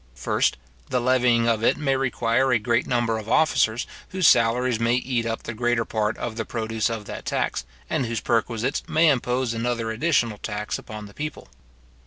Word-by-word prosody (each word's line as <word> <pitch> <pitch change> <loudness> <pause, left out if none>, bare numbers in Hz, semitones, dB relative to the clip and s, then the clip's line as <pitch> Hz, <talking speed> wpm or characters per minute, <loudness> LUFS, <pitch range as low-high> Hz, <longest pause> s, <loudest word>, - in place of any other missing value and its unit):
First, - - 0 0.3
the 125 - +1
levying 120 -2 +3
of 115 -1 +1
it - - +3
may 135 -3 +1
require 130 0 +1
a 125 - +5
great 115 +2 0
number 120 -2 0
of 110 0 -8
officers, 125 -7 +2 0.2
whose 185 -4 +2
salaries 120 0 +3
may 115 +1 +2
eat 125 -2 -1
up 115 0 -3
the 115 - -5
greater 120 0 0
part 110 0 -1
of 115 -1 -5
the 115 - -1
produce 110 0 -2
of 110 -2 -4
the - - -6
tax, - - -2 0.2
and 125 - -1
whose 115 -1 -2
perquisites 115 +3 0
may 160 +1 +4
impose 125 -2 0
another 115 -1 -1
additional 115 -4 +1
tax 105 -1 -4
upon 110 -1 -8
the 100 - -13
people. 150 0 -6
115 Hz, 185 wpm, -24 LUFS, 115-125 Hz, 0.3 s, a